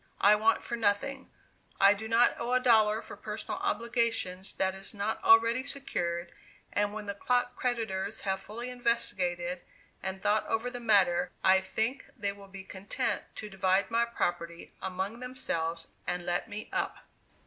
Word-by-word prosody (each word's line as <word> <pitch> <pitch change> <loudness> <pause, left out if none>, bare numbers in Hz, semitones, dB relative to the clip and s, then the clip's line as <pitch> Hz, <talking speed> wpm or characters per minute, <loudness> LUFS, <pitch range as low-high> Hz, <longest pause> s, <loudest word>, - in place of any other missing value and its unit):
I 205 - +7
want 220 +2 +3
for 235 - -3
nothing; 230 +5 0 0.5
I 200 +1 +7
do 215 +2 -6
not 230 +2 +5
owe 240 +1 -1
a 255 - +5
dollar 220 -3 +4
for - - -9
personal - - -5
obligations 230 -5 0
that 190 0 +1
is 195 +3 -6
not 205 +2 -2
already 230 +2 +6
secured, 175 -11 -3 0.4
and 205 0 +2
when 215 0 -6
the 200 - -3
clock 245 +4 0
creditors 220 -4 -2
have 190 -1 -1
fully 235 +4 -6
investigated 180 -8 -1 0.4
and 190 0 -4
thought 210 +2 +1
over 230 +3 -1
the 245 - -5
matter, 195 -7 +3
I 190 0 +6
think 220 +7 -1
they 200 -3 0
will 200 0 -13
be 195 0 -9
content 195 +1 -2
to 215 - -6
divide 195 +1 +1
my 230 +1 +3
property 175 -7 -3
among 190 +4 -3
themselves 170 -10 -3 0.2
and 180 0 -2
let 175 +4 -1
me 210 +1 -6
up." 390 +1 -2
205 Hz, 160 wpm, -30 LUFS, 190-235 Hz, 0.5 s, I